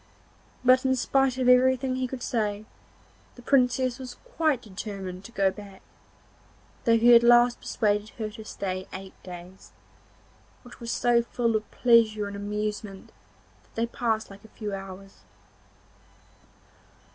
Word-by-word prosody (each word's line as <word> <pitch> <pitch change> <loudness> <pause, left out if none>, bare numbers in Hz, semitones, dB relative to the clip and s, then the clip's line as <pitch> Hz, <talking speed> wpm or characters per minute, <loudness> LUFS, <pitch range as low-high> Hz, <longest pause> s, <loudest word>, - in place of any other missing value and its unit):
But, 255 +1 +6
in 260 0 +2
spite 265 0 +1
of 255 -1 0
everything 255 +1 +4
he 255 0 -1
could 250 0 -7
say, 210 -2 -2 0.7
the 245 - -14
Princess 255 -1 +2
was 250 -2 -8 0.2
quite 305 -6 +1
determined 190 -2 -7
to 235 - -10
go 195 -5 +2
back, 200 -1 -12 1.0
though 230 -1 +5
he 240 +2 +6
at 235 - +8
last 240 0 +5
persuaded 210 -1 -1
her 215 -2 -4
to 220 - -10
stay 185 -3 -5
eight 190 0 -8
days, 180 +1 -11 0.9
which 245 -1 -14
were 235 - -8
so 240 0 +2
full 235 -1 -1
of 215 0 -2
pleasure 225 -3 +3
and 200 - -7
amusement 210 -1 -5 0.5
that - - -31
they 230 - 0
passed 225 -3 -2
like 195 - -13
a - - -14
few 210 -2 -4
hours. 195 0 -9
225 Hz, 145 wpm, -26 LUFS, 200-245 Hz, 1.0 s, at